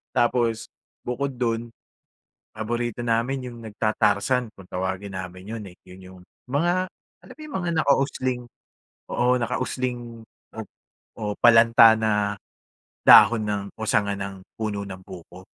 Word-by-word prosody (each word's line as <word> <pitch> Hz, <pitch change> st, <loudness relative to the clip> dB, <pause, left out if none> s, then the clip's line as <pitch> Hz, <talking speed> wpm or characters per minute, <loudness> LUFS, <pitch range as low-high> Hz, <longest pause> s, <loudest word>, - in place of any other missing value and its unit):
Tapos 120 Hz, -2 st, +1 dB, 0.4 s
bukod 135 Hz, +3 st, -2 dB
dun, 115 Hz, -1 st, -1 dB, 0.8 s
paborito 120 Hz, +2 st, -3 dB
namin 120 Hz, +2 st, -1 dB
yung 120 Hz, -, -11 dB
nagtatarzan 110 Hz, +2 st, 0 dB
kung 95 Hz, -, -13 dB
tawagin 95 Hz, +2 st, -4 dB
namin 95 Hz, 0 st, -7 dB
yun, 110 Hz, -, -6 dB
eh, 90 Hz, -, -13 dB
yun 90 Hz, +1 st, -14 dB, 0.2 s
yung -, -, -15 dB, 0.3 s
mga 175 Hz, +7 st, +1 dB, 0.3 s
alam -, -, -14 dB
yung 305 Hz, -, -8 dB
mga 175 Hz, -2 st, -2 dB
nakausling, 130 Hz, -3 st, +1 dB, 0.7 s
oo 125 Hz, +1 st, +2 dB
nakausling 120 Hz, -1 st, -3 dB, 0.9 s
o 105 Hz, -2 st, -3 dB
palanta 115 Hz, -1 st, +7 dB
na 110 Hz, 0 st, 0 dB, 0.9 s
dahon 115 Hz, -2 st, +8 dB
ng, 105 Hz, -1 st, -2 dB
o 110 Hz, -, -4 dB
sanga 100 Hz, -1 st, +2 dB
ng 100 Hz, -1 st, -6 dB, 0.2 s
puno 105 Hz, -2 st, -3 dB
ng 95 Hz, -1 st, -8 dB
buko. 90 Hz, +1 st, -12 dB
115 Hz, 125 wpm, -24 LUFS, 100-125 Hz, 0.9 s, dahon